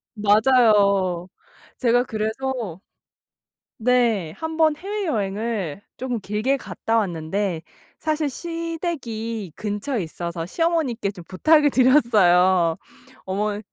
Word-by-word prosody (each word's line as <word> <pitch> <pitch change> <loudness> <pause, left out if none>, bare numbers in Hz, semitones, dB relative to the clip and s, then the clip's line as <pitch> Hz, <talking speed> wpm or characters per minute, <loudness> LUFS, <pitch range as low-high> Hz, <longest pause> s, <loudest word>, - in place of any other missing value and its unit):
맞아요. 205 -5 +3 0.5
제가 245 -1 +3
그래서 220 -3 -3 1.0
네. 230 -8 +2
1 320 - -6
번 315 -2 +4
해외여행을 225 - -3 0.2
쪼금 250 -2 -3
길게 215 +8 0
갔다 230 -3 -2
왔는데 180 -2 -1 0.4
사실 310 -1 -1
시댁이 280 - -4
근처에 215 +4 -3
있어서 170 +1 -5
시어머니께 310 - 0
좀 185 -4 -11
부탁을 300 - +4
드렸어요. 190 - +4 0.5
어머 205 +2 -2
220 Hz, 220 characters per minute, -23 LUFS, 195-265 Hz, 1.0 s, 번